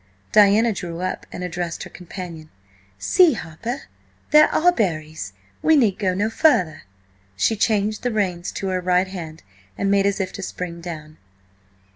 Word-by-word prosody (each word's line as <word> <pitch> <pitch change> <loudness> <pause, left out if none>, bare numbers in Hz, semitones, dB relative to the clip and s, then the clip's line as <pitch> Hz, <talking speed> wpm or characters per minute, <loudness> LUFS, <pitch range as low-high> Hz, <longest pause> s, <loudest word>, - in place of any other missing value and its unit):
Diana 215 +2 +5
drew 175 -2 -5
up 185 0 -3
and 180 - -6
addressed 175 -1 -4
her - - -9
companion. 175 -3 -8 0.5
"See, 330 - +4
Harper–there 240 - 0
are 355 +3 +4
berries! 155 - -2 0.3
We 320 - +5
need 225 -10 +3
go 185 -3 +1
no 205 +3 +1
further." 185 - +2 0.5
She 100 - +2
changed 215 0 +1
the 245 - -1
reins 185 -5 -1
to 195 - -3
her 185 -1 -1
right 180 +1 +2
hand 165 -4 -8 0.3
and 200 0 0
made 200 0 +3
as 200 +1 0
if 190 - -2
to - - -6
spring 175 -2 -5
down. 155 -3 -8
185 Hz, 155 wpm, -22 LUFS, 170-215 Hz, 0.5 s, Diana